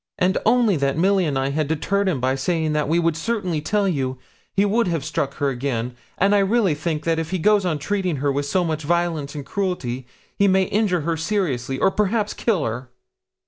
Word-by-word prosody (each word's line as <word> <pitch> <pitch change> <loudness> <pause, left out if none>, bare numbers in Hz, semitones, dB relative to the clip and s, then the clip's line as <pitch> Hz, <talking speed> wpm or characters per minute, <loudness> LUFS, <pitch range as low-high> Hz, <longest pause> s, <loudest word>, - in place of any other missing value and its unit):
'And 185 +1 +2
only 230 -5 +4
that 140 0 0
Milly 190 +2 +3
and 145 -3 -1
I 135 +1 0
deterred 175 +6 0
him 155 -8 -1
by 130 +1 +1
saying 160 +2 0
that 150 -1 0
we 165 - +3
would 165 -2 +2
certainly 180 -3 -2
tell 200 +6 +1
you, 130 -7 -1 0.3
he 200 +1 +2
would 220 +2 +2
have 165 -5 -1
struck 140 -2 -2
her 145 -2 0
again; 125 -2 -3 0.2
and 200 +2 +3
I 205 - +5
really 200 -2 +2
think 150 0 -3
if 165 -1 0
he 185 - -1
goes 205 +1 +3
on 160 -3 0
treating 185 +2 -1
her 140 +1 0
with 140 +1 -2
so 180 +5 +1
much 160 -2 -2
violence 160 -2 -1
and 145 -2 -6
cruelty 135 -12 -3 0.3
he 200 - +3
may 190 0 +4
injure 190 -3 +1
her 165 +2 -1
seriously, 150 - -1
or 195 - +3
perhaps 210 +1 0
kill 200 -11 0
her.' 125 +3 -4
165 Hz, 210 wpm, -22 LUFS, 140-195 Hz, 0.3 s, I